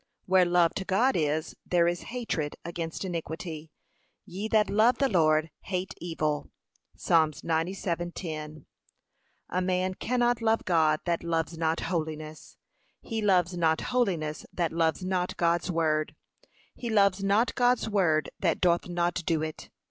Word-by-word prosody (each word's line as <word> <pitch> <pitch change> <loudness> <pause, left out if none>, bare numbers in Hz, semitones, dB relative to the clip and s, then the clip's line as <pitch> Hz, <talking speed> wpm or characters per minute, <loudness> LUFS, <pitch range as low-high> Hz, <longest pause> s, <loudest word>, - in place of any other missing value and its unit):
Where 185 -1 +4
love 175 -1 +3
to 195 - -2
God 230 +8 +2
is, 155 -1 -1
there 170 -1 +2
is 175 0 -1
hatred 225 -12 -3
against 170 +1 -4
iniquity; 165 -2 -5 0.6
'ye 195 +5 -5
that 215 -1 +3
love 215 +5 +3
the 275 - +2
Lord, 155 -6 +2
hate 185 0 -3
evil.' 155 -3 -2 0.5
(Psa. 160 -2 +3
97:10) 165 -2 -3 0.8
A 185 - 0
man 185 0 0
cannot 240 +2 0
love 225 0 +1
God 160 -3 +3
that 170 -1 -1
loves 165 -1 -1
not 160 0 0
holiness; 155 -2 -4 0.4
he 225 -2 -4
loves 185 -3 +2
not 160 -2 +2
holiness 170 -11 0
that 170 -3 -1
loves 165 +2 0
not 185 -1 -1
God's 170 +1 +1
word; 155 -3 0 0.6
he 240 - -6
loves 200 -3 +3
not 205 +5 +2
God's 245 -1 +2
word 170 -8 +1
that 170 -4 +1
doth 175 -1 +2
not 175 0 0
do 160 -2 +1
it. 155 -1 -6
175 Hz, 140 wpm, -28 LUFS, 160-190 Hz, 0.8 s, Where